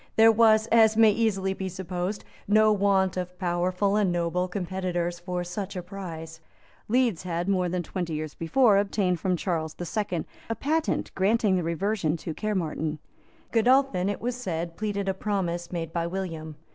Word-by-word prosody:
There 225 Hz, 0 st, +7 dB
was, 220 Hz, -1 st, +5 dB
as 220 Hz, -1 st, +5 dB
may 225 Hz, -1 st, +7 dB
easily 200 Hz, -3 st, 0 dB
be 190 Hz, 0 st, -4 dB
supposed, 185 Hz, +2 st, -4 dB, 0.2 s
no 215 Hz, +1 st, +5 dB
want 195 Hz, -2 st, +2 dB
of 180 Hz, 0 st, -4 dB
powerful 180 Hz, +2 st, 0 dB
and 205 Hz, -4 st, +2 dB
noble 175 Hz, +1 st, 0 dB
competitors 180 Hz, -2 st, -2 dB
for 180 Hz, 0 st, -3 dB
such 190 Hz, +3 st, -5 dB
a 180 Hz, -, -4 dB
prize. 165 Hz, -4 st, -8 dB, 0.5 s
Leeds 235 Hz, -6 st, +2 dB
had, 175 Hz, 0 st, -3 dB
more 185 Hz, -2 st, +1 dB
than 180 Hz, 0 st, -2 dB
twenty 175 Hz, -1 st, -4 dB
years 155 Hz, 0 st, -4 dB
before, 205 Hz, +5 st, +3 dB
obtained 195 Hz, -3 st, 0 dB
from 185 Hz, +1 st, 0 dB
Charles 160 Hz, -3 st, -2 dB
the 175 Hz, -, -5 dB
Second 180 Hz, -3 st, -2 dB, 0.2 s
a 225 Hz, -, -1 dB
patent 315 Hz, +5 st, -1 dB
granting 205 Hz, +1 st, +2 dB
the 180 Hz, -, +1 dB
reversion 170 Hz, 0 st, -1 dB
to 160 Hz, 0 st, -5 dB
Caermarthen. 160 Hz, -5 st, -2 dB, 0.5 s
Godolphin, 235 Hz, -5 st, +3 dB
it 205 Hz, -, -3 dB
was 245 Hz, +1 st, -2 dB
said, 170 Hz, -8 st, -4 dB
pleaded 200 Hz, -1 st, -2 dB
a 190 Hz, -, +1 dB
promise 185 Hz, -4 st, -2 dB
made 165 Hz, -2 st, -4 dB
by 170 Hz, -1 st, -1 dB
William. 165 Hz, -4 st, -5 dB
185 Hz, 170 wpm, -26 LUFS, 175-210 Hz, 0.5 s, There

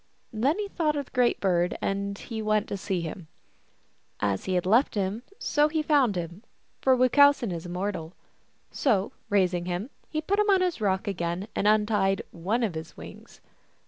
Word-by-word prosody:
Then 265 Hz, -, +1 dB
he 420 Hz, -1 st, -2 dB
thought 320 Hz, -6 st, 0 dB
of 285 Hz, -1 st, -2 dB
the -, -, -24 dB
Great 250 Hz, -2 st, +2 dB
Bird, 180 Hz, -2 st, +1 dB
and 200 Hz, 0 st, -2 dB, 0.2 s
went 215 Hz, -1 st, +1 dB
to -, -, -2 dB
see 190 Hz, -2 st, -2 dB
him. 165 Hz, +1 st, -7 dB, 0.9 s
As 100 Hz, -2 st, -1 dB
he 185 Hz, -, -1 dB
had 180 Hz, -, 0 dB
left 230 Hz, +8 st, +3 dB
him 200 Hz, +2 st, -1 dB, 0.5 s
he 310 Hz, 0 st, -1 dB
found 280 Hz, -9 st, +3 dB
him, 175 Hz, +2 st, -5 dB, 0.4 s
for 260 Hz, -1 st, +4 dB
Wuchowsen 255 Hz, -2 st, +5 dB
is 170 Hz, 0 st, -5 dB
immortal. 180 Hz, -2 st, -4 dB, 0.6 s
So, 210 Hz, -8 st, +1 dB, 0.2 s
raising 180 Hz, -3 st, +1 dB
him, 180 Hz, +8 st, -3 dB, 0.2 s
he 310 Hz, -, -2 dB
put 390 Hz, +6 st, 0 dB
him 420 Hz, 0 st, +2 dB
on 385 Hz, -2 st, +5 dB
his 360 Hz, -9 st, -1 dB
rock 195 Hz, +1 st, 0 dB
again, 180 Hz, 0 st, -2 dB
and 205 Hz, -, +1 dB
untied 210 Hz, -2 st, +2 dB
one 205 Hz, +9 st, -1 dB
of 210 Hz, -6 st, 0 dB
his 160 Hz, 0 st, -8 dB
wings. -, -, -12 dB
205 Hz, 175 wpm, -27 LUFS, 180-260 Hz, 0.9 s, Wuchowsen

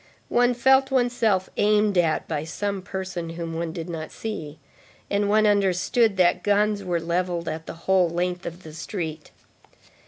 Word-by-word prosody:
One 245 Hz, 0 st, +3 dB
felt 265 Hz, +2 st, +4 dB
oneself 240 Hz, -7 st, +1 dB
aimed 210 Hz, -1 st, +3 dB
at 165 Hz, -3 st, +1 dB
by 145 Hz, -, -2 dB
some 200 Hz, +4 st, -3 dB
person 185 Hz, -3 st, -5 dB
whom 165 Hz, 0 st, -5 dB
one 165 Hz, 0 st, -3 dB
did 165 Hz, 0 st, -6 dB
not 160 Hz, -2 st, -6 dB
see, 160 Hz, -9 st, -6 dB, 0.5 s
and 200 Hz, 0 st, +1 dB
one 215 Hz, +1 st, +4 dB
understood 200 Hz, +2 st, +2 dB
that 180 Hz, 0 st, +3 dB
guns 205 Hz, 0 st, +2 dB
were 175 Hz, -2 st, -1 dB
levelled 170 Hz, 0 st, -2 dB
at 160 Hz, +1 st, -4 dB
the -, -, -5 dB
whole 190 Hz, -2 st, +4 dB
length 180 Hz, +1 st, -2 dB
of 170 Hz, +2 st, -8 dB
the 155 Hz, -, -10 dB
street. 160 Hz, -2 st, -5 dB
185 Hz, 160 wpm, -24 LUFS, 170-210 Hz, 0.5 s, felt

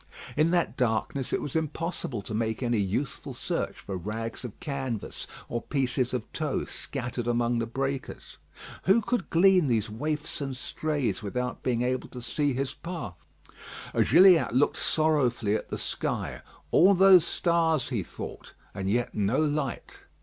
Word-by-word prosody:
In 155 Hz, +2 st, +3 dB
that 175 Hz, 0 st, +1 dB
darkness 125 Hz, +2 st, 0 dB
it -, -, 0 dB
was 145 Hz, -, -5 dB
impossible 160 Hz, -, -2 dB
to -, -, -7 dB
make 110 Hz, +2 st, -1 dB
any 120 Hz, -2 st, +1 dB
useful 100 Hz, +8 st, -2 dB
search -, -, -2 dB
for 100 Hz, -, -5 dB
rags 110 Hz, +7 st, -4 dB
of 120 Hz, -4 st, -8 dB
canvas 135 Hz, -7 st, -4 dB, 0.2 s
or 120 Hz, -, -3 dB
pieces 130 Hz, -2 st, 0 dB
of 125 Hz, -3 st, -2 dB
tow 155 Hz, -3 st, -1 dB
scattered 120 Hz, -3 st, -5 dB
among 120 Hz, 0 st, +1 dB
the 115 Hz, -, -1 dB
breakers. 135 Hz, +2 st, -4 dB, 0.5 s
Who 195 Hz, +5 st, +5 dB
could 240 Hz, -4 st, -1 dB
glean 180 Hz, -1 st, +5 dB
these 110 Hz, -3 st, 0 dB
waifs 150 Hz, +7 st, -3 dB
and 135 Hz, -2 st, -3 dB
strays 140 Hz, -7 st, -2 dB
without 125 Hz, +5 st, -3 dB
being 120 Hz, -1 st, 0 dB
able 125 Hz, 0 st, -1 dB
to 125 Hz, -, -8 dB
see 145 Hz, +2 st, 0 dB
his 135 Hz, +1 st, -2 dB
path? 170 Hz, -, -7 dB, 0.7 s
Gilliatt 175 Hz, -, +6 dB
looked 135 Hz, -, +3 dB
sorrowfully 130 Hz, -9 st, +2 dB
at 110 Hz, -, -2 dB
the -, -, -4 dB
sky; -, -, -3 dB, 0.3 s
all 195 Hz, +4 st, +6 dB
those 190 Hz, -2 st, +8 dB
stars, 165 Hz, -6 st, +1 dB
he 120 Hz, -6 st, -1 dB
thought, -, -, -8 dB, 0.2 s
and 95 Hz, 0 st, -3 dB
yet 120 Hz, +3 st, 0 dB
no 105 Hz, +5 st, +1 dB
light! 150 Hz, -4 st, -1 dB
130 Hz, 155 wpm, -28 LUFS, 115-155 Hz, 0.7 s, those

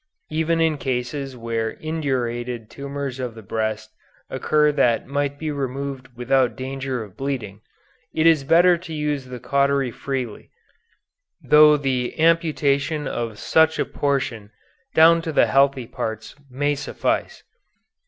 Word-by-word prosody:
Even 160 Hz, +1 st, +1 dB
in 160 Hz, -3 st, +1 dB
cases 130 Hz, +1 st, -3 dB
where 115 Hz, -1 st, -2 dB
indurated 125 Hz, -7 st, -3 dB
tumors 140 Hz, -1 st, -5 dB
of 125 Hz, -3 st, -4 dB
the 110 Hz, -, -11 dB
breast 110 Hz, +1 st, -3 dB, 0.4 s
occur 150 Hz, -1 st, +2 dB
that 120 Hz, -6 st, +2 dB
might 140 Hz, +1 st, -2 dB
be 155 Hz, 0 st, -3 dB
removed 135 Hz, -1 st, -4 dB
without 130 Hz, 0 st, +2 dB
danger 130 Hz, -2 st, -4 dB
of 100 Hz, -4 st, -14 dB
bleeding, 120 Hz, -7 st, -4 dB, 0.5 s
it 160 Hz, -, 0 dB
is 160 Hz, -4 st, +5 dB
better 175 Hz, +4 st, +5 dB
to 165 Hz, -3 st, -8 dB
use 150 Hz, -3 st, -2 dB
the 125 Hz, -1 st, -8 dB
cautery 140 Hz, 0 st, +1 dB
freely, 130 Hz, -4 st, -5 dB, 0.9 s
though 150 Hz, 0 st, +7 dB
the 130 Hz, -1 st, -2 dB
amputation 155 Hz, -3 st, +2 dB
of 115 Hz, -4 st, -4 dB
such 160 Hz, +6 st, +3 dB
a -, -, 0 dB
portion 130 Hz, -7 st, -2 dB, 0.5 s
down 165 Hz, +1 st, +6 dB
to 165 Hz, -1 st, -4 dB
the -, -, +4 dB
healthy 135 Hz, -2 st, +2 dB
parts 110 Hz, -1 st, -5 dB, 0.2 s
may 145 Hz, +3 st, 0 dB
suffice." 140 Hz, -1 st, -2 dB
135 Hz, 135 wpm, -22 LUFS, 125-150 Hz, 0.9 s, though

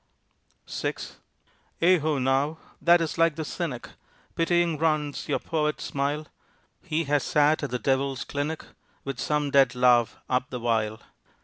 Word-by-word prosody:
VI -, -, -2 dB, 0.8 s
"Ai 180 Hz, +1 st, +5 dB
ho 155 Hz, -1 st, 0 dB
now! 135 Hz, +4 st, +1 dB, 0.2 s
that 170 Hz, 0 st, +5 dB
is 165 Hz, 0 st, -3 dB
like 165 Hz, -2 st, +4 dB
the 160 Hz, -1 st, -4 dB
cynic," 145 Hz, -7 st, -4 dB, 0.5 s
Pitying 170 Hz, -2 st, +1 dB
runs 155 Hz, -3 st, 0 dB
your -, -, +2 dB
poet 150 Hz, -2 st, -1 dB
smile, 145 Hz, +2 st, -2 dB, 0.6 s
"He 165 Hz, -2 st, -1 dB
has 145 Hz, -1 st, +1 dB
sat 150 Hz, -1 st, +3 dB
at 145 Hz, -, -3 dB
the 125 Hz, -, -1 dB
Devil's 135 Hz, 0 st, 0 dB
clinic 145 Hz, +3 st, -4 dB, 0.4 s
With 135 Hz, -2 st, -5 dB
some 150 Hz, -1 st, 0 dB
dead 135 Hz, -1 st, +4 dB
love 125 Hz, -2 st, +3 dB
up 125 Hz, 0 st, 0 dB
the 125 Hz, -, -5 dB
while." 110 Hz, -2 st, -1 dB
145 Hz, 145 wpm, -26 LUFS, 135-160 Hz, 0.8 s, Ai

